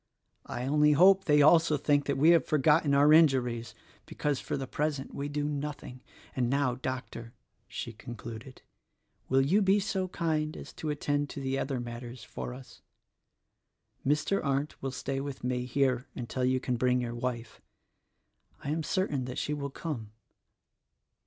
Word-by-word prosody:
I 125 - -4
only 150 +2 +4
hope 190 +5 +6
they 150 -1 +5
also 155 0 +5
think 145 0 +1
that 140 -1 0
we 155 +5 +6
have 170 - +5
forgotten 150 0 +3
our 145 +2 +6
injuries 125 -7 +3 0.3
(because, 145 -2 -1
for - - -3
the 135 - -3
present, 145 0 -3
we 140 +1 -4
do 145 0 -2
nothing). 145 -3 -5 0.3
And 125 -2 0
now, 135 -1 +1
Doc 130 0 -4
tor," 115 0 -9 0.3
she 115 - -6
concluded, 120 +2 -9 0.7
"will 135 +1 +4
you 195 +9 +3
be 195 +1 +4
so 190 -2 -1
kind 155 -3 -1
as - - -10
to 155 - -5
attend 145 -1 -1
to - - -7
the 135 0 -2
other 135 -2 -2
matters 120 0 -7
for - - -6
us. 130 +1 -12 1.2
Mr. 150 +8 +1
Arndt 140 +1 -2
will 135 - -2
stay 135 +1 -3
with 140 -1 -6
me 125 0 -1
here 130 -1 0
until 125 +1 -2
you 130 0 +2
can 125 -1 -2
bring 125 +1 +2
your 120 -1 -4
wife. 120 -2 -5 1.0
I 140 - -2
am 160 +2 -1
certain 150 -4 -1
that 125 0 -6
she 150 - -1
will 140 -1 -3
come." 130 -8 -6
140 Hz, 165 wpm, -29 LUFS, 125-150 Hz, 1.2 s, hope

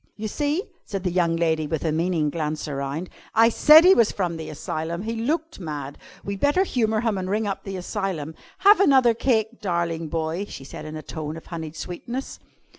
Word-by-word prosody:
"You 215 +1 -4
see!" 295 - -1 0.2
said 195 -3 -5
the 180 - 0
young 170 -2 +2
lady 160 -2 +1
with 160 +1 -3
a 160 - +2
meaning 160 -2 0
glance 155 -1 -3
around. 140 +4 -3 0.3
"I 225 +1 +6
said 305 +7 +7
he 375 - +9
was 230 - +4
from 175 -4 -2
the 160 -1 -6
asylum. 160 +4 -4
He 225 +1 -3
looked 310 +8 -2
mad. 145 -5 -6 0.2
We'd 200 0 -4
better 290 - +3
humour 220 - 0
him 225 -5 0
and 185 0 -4
ring 215 +2 0
up 195 -2 -3
the 195 -1 -5
asylum. 180 -5 -3 0.3
Have 410 0 +8
another 265 -10 +5
cake, 230 -1 0
darling 170 -3 -1
boy," 165 +4 -2
she - - -8
said 145 +3 -9
in 155 0 -7
a 155 - -7
tone 155 +1 -5
of 165 - -11
honeyed 160 -2 -6
sweetness. 235 +11 -6
180 Hz, 200 wpm, -24 LUFS, 160-230 Hz, 0.3 s, he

